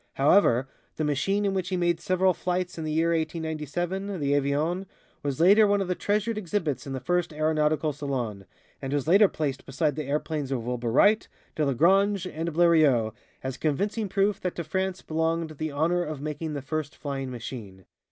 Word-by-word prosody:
However, 135 -4 +4 0.3
the 155 - -2
machine 195 +8 0
in 195 - +1
which 185 -1 -2
he 185 - -1
made 175 -1 +1
several 185 +2 +2
flights 180 +2 -2
in 160 - -5
the 155 - -2
year 165 +2 +2
1897, 165 +4 -2
the 140 -1 +1
"Avion," 150 +7 0 0.3
was 140 -2 -3
later 205 +5 +6
one 205 0 +2
of 195 - -1
the 180 - +1
treasured 210 +4 -1
exhibits 165 - -2
of 135 - -4
the 130 - -3
first 175 +5 0
Aeronautical 155 0 +1
Salon, 125 -9 -4 0.3
and 135 +1 -3
was 145 -1 -1 0.2
placed 140 -4 -3
beside 145 +2 -1
the 155 - -4
airplanes 150 -1 -2
of 120 -4 -2
Wilbur 120 -1 -2
Wright, 210 - +4 0.3
Delagrange 185 - +3
and 165 -1 -3
Blériot 155 -9 +4 0.3
"as 130 0 -4
convincing 200 +8 -1
proof 200 +1 +1
that 180 - -2
to 170 - -3
France 190 +4 -2
belonged 160 0 -1
the 155 - -1
honor 165 +5 +1
of 155 -3 -5
making 150 +2 -4
the 140 -2 -4
first 155 +1 -3
flying 135 -2 -4
machine." 110 -6 -8
155 Hz, 180 wpm, -27 LUFS, 140-180 Hz, 0.3 s, later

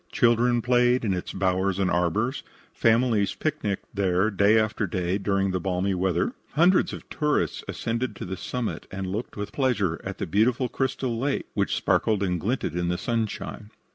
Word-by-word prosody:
Children 120 0 +3
played 125 0 +3
in 100 - +1
its 90 - -4
bowers 95 0 0
and 95 -2 +1
arbors; 105 - 0 0.3
families 115 -3 +2
picnicked 145 -11 -2
there 95 +1 +1
day 100 +2 +4
after 110 0 +1
day 90 -1 -1
during 100 -1 +1
the 95 - -1
balmy 95 +2 0
weather; 95 -1 0 0.2
hundreds 175 +5 +4
of - - -8
tourists 150 -1 0
ascended 115 0 -2
to - - -6
the 95 +1 -4
summit 125 +4 -4
and 95 0 -4
looked 100 +6 -4
with 105 0 -4
pleasure 110 - 0
at 95 0 -5
the - - -2
beautiful 115 - +2
crystal 130 -3 -2
lake 140 +2 -1
which - - 0
sparkled 105 -3 +1
and 90 -2 0
glinted 110 - -1
in 90 0 -1
the 90 0 0
sunshine. 110 -2 -3
105 Hz, 170 wpm, -26 LUFS, 95-120 Hz, 0.3 s, day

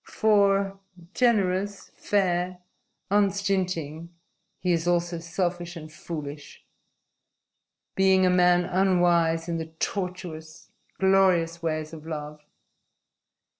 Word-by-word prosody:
For 200 -2 +2 0.3
generous, 200 -4 0
fair, 180 -2 0 0.5
unstinting 185 -6 0 0.5
he 180 - -1
is 170 0 0
also 175 -1 0
selfish 175 +1 -3
and 155 -2 -10
foolish, 150 -5 -8 1.3
being 190 -1 +4
a 180 - +4
man 180 -1 +4
unwise 175 -3 +2
in 170 -1 -2
the 160 - -5
tortuous, 165 -2 -6 0.3
glorious 185 -3 +3
ways 155 -1 -3
of 160 0 -10
love. 150 -1 -6
175 Hz, 95 wpm, -26 LUFS, 165-190 Hz, 1.3 s, being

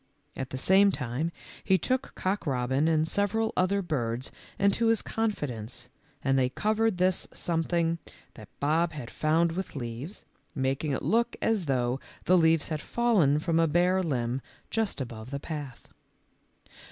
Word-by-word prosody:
At 130 -1 -4
the 130 - -4
same 195 +8 +5
time 130 +4 -2 0.3
he 190 -2 +4
took 255 +9 -1
Cock 190 -2 -2
robin 130 +3 +1
and 160 -1 +2
several 220 +4 +1
other 195 +2 +2
birds 125 -6 -2 0.3
into 200 +3 +3
his 225 -1 +3
confi 225 -8 -1
dence 115 -3 -6 0.3
and 135 0 +3
they 125 -1 +2
covered 215 +7 +1
this 185 0 +2
something 165 0 0 0.3
that - - -12
Bob 160 +3 +1
had 130 -6 -7
found 160 +2 +2
with 185 0 -5
leaves, 125 - -6 0.3
making 135 +2 0
it 135 - -2
look 235 +2 +2
as 220 -6 +1
though 125 -2 0 0.3
the 185 - +5
leaves 160 -3 +4
had 155 -2 -2
fallen 205 -12 +3
from 165 +1 +1
a 165 - +4
bare 180 +4 +3
limb 130 -6 -1 0.3
just 220 -9 0
above 115 -2 -7
the 140 +1 -4
path. 145 -5 -7
160 Hz, 155 wpm, -28 LUFS, 135-190 Hz, 0.3 s, same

